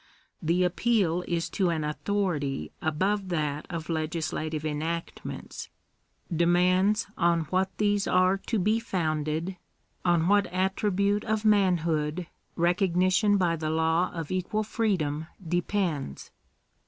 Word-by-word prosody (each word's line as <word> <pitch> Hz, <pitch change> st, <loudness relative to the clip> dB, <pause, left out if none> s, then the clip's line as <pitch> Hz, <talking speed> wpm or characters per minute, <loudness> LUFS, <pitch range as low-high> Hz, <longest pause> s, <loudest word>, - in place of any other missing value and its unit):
The 170 Hz, +3 st, +2 dB
appeal 180 Hz, -2 st, +1 dB
is 170 Hz, -1 st, -1 dB
to 185 Hz, -3 st, +1 dB
an 160 Hz, -2 st, -1 dB
authority 150 Hz, -, -2 dB
above 190 Hz, +5 st, 0 dB
that 150 Hz, -3 st, -2 dB
of 165 Hz, -3 st, -5 dB
legislative 155 Hz, -1 st, -2 dB
enactments 160 Hz, +3 st, -4 dB, 0.3 s
— -, -, -45 dB, 0.3 s
demands 180 Hz, +5 st, +3 dB
on 170 Hz, -1 st, +3 dB
what 190 Hz, +1 st, +2 dB
these 205 Hz, -1 st, +1 dB
are 185 Hz, +1 st, +3 dB
to 230 Hz, -, +1 dB
be 210 Hz, +4 st, +2 dB
founded 160 Hz, -3 st, -2 dB, 0.2 s
— -, -, -42 dB
on 165 Hz, 0 st, +2 dB
what 205 Hz, 0 st, +4 dB
attribute 200 Hz, +2 st, 0 dB
of 220 Hz, 0 st, -1 dB
man 200 Hz, -4 st, +4 dB
hood 155 Hz, +1 st, -1 dB, 0.3 s
recognition 185 Hz, +3 st, +3 dB
by 175 Hz, -3 st, +2 dB
the 155 Hz, -1 st, -3 dB
law 160 Hz, +2 st, +2 dB
of 165 Hz, -2 st, -5 dB
equal 185 Hz, +4 st, -1 dB
freedom 165 Hz, -9 st, -1 dB, 0.2 s
depends. 175 Hz, -, -2 dB
175 Hz, 125 wpm, -27 LUFS, 160-195 Hz, 0.3 s, what